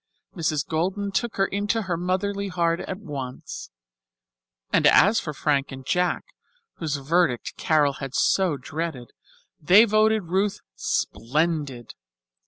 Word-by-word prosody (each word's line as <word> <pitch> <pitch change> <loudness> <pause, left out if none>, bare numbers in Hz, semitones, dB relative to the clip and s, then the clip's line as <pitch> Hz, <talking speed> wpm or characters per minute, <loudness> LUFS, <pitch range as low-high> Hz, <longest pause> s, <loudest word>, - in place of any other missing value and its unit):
Mrs. 155 -4 -1
Golden 190 +5 -1
took 230 +4 -1
her 195 - +2
into 205 +3 -1
her 180 -3 -2
motherly 195 +3 -1
heart 170 -2 0
at 190 - -5
once; 140 -10 -7 1.0
and - - +5
as 210 +4 +6
for 155 - -5
Frank 140 -1 0
and 135 -1 -9
Jack, 180 +4 0 0.5
whose 155 -4 -2
verdict 140 -2 0
Carol 150 -3 +2
had 135 -2 -5
so 180 -3 +2
dreaded, 145 -2 -5 0.5
they 190 +9 +7
voted 215 0 +3
Ruth 190 +4 0 0.2
"splendid." 135 - -1
170 Hz, 125 wpm, -24 LUFS, 145-195 Hz, 1.0 s, they